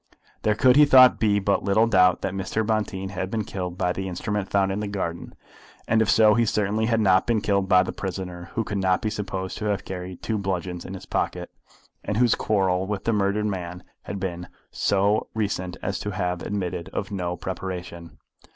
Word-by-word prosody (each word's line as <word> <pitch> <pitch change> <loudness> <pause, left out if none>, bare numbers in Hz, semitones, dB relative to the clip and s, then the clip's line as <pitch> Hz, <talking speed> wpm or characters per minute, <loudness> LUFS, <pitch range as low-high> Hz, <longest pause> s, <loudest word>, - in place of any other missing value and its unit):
There 105 -1 +2
could, 125 +4 +5
he 150 - +8
thought, 130 -3 +7
be 105 -2 +3
but 100 0 +1
little 105 +3 +3
doubt 90 -5 +4
that 95 - -2
Mr. 95 +3 -2
Bonteen 105 -3 -1
had 95 -1 -4
been 110 +1 -2
killed 90 -3 -5
by 90 -2 0
the 95 0 -4
instrument 100 +2 -3
found 95 -1 +2
in 100 - -2
the 105 - -3
garden, 95 -4 -4 0.5
and 110 0 +3
if 110 - +1
so, 110 -1 +6
he 115 - +3
certainly 105 0 0
had 115 -1 +2
not 95 -3 +3
been 115 -2 +2
killed 100 -2 0
by 90 0 +6
the - - -4
prisoner, 90 -2 -6
who 115 - +1
could 100 -1 -3
not 95 -1 +1
be 110 - 0
supposed 95 -3 -4
to 110 - -4
have 100 -2 -1
carried 90 -1 -7
two 110 -2 -1
bludgeons 90 -2 -3
in 95 - -6
his 95 - -9
pocket, - - -2 0.5
and 105 - -2
whose 120 -1 +4
quarrel 95 -3 0
with 100 -1 -3
the 115 - +1
murdered 105 +1 +1
man 90 -3 -4 0.2
had 100 - -6
been 90 -2 -4 0.2
so 100 +2 +1
recent 95 -4 -2
as 95 - -2
to 105 - -4
have 90 -2 -2
admitted 90 -4 -3
of - - -4
no 90 -3 -3
preparation. 90 -2 -6
95 Hz, 205 wpm, -24 LUFS, 90-105 Hz, 0.5 s, he